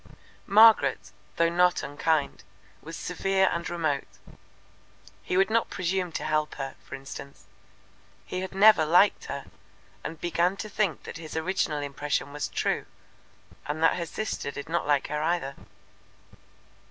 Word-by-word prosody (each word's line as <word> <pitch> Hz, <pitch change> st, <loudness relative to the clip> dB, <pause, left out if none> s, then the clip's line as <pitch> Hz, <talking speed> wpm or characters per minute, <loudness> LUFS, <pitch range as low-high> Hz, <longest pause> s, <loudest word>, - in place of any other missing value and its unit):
Margaret, 220 Hz, +2 st, +5 dB, 0.2 s
though 170 Hz, 0 st, +3 dB
not 180 Hz, +1 st, +2 dB
unkind, 145 Hz, +1 st, -1 dB, 0.4 s
was 165 Hz, +1 st, -8 dB
severe 190 Hz, +2 st, +1 dB
and 170 Hz, 0 st, -3 dB
remote. 160 Hz, -5 st, -1 dB, 1.1 s
He 180 Hz, -, -2 dB
would 195 Hz, +3 st, +3 dB
not 230 Hz, 0 st, +2 dB
presume 180 Hz, 0 st, -1 dB
to -, -, -3 dB
help 155 Hz, 0 st, 0 dB
her, 135 Hz, -1 st, -5 dB
for -, -, -8 dB
instance. 135 Hz, +1 st, -10 dB, 0.8 s
He 185 Hz, -, -4 dB
had 190 Hz, 0 st, -6 dB
never 205 Hz, -4 st, +7 dB
liked 180 Hz, +6 st, +4 dB
her, 140 Hz, 0 st, -5 dB, 0.6 s
and 160 Hz, -, -6 dB
began 175 Hz, +2 st, 0 dB
to 215 Hz, -, -6 dB
think 200 Hz, -4 st, -1 dB
that -, -, -8 dB
his 160 Hz, -1 st, -7 dB
original 160 Hz, -3 st, -1 dB
impression 145 Hz, 0 st, -2 dB
was 150 Hz, -, -3 dB
true, -, -, -1 dB, 0.8 s
and 155 Hz, +2 st, -2 dB
that 165 Hz, -, +4 dB
her 170 Hz, -1 st, -3 dB
sister 215 Hz, -8 st, -4 dB
did 145 Hz, +2 st, -7 dB
not 170 Hz, -2 st, -1 dB
like 145 Hz, -2 st, +2 dB
her 150 Hz, 0 st, -2 dB
either. 155 Hz, -4 st, -1 dB
165 Hz, 145 wpm, -27 LUFS, 145-185 Hz, 1.1 s, never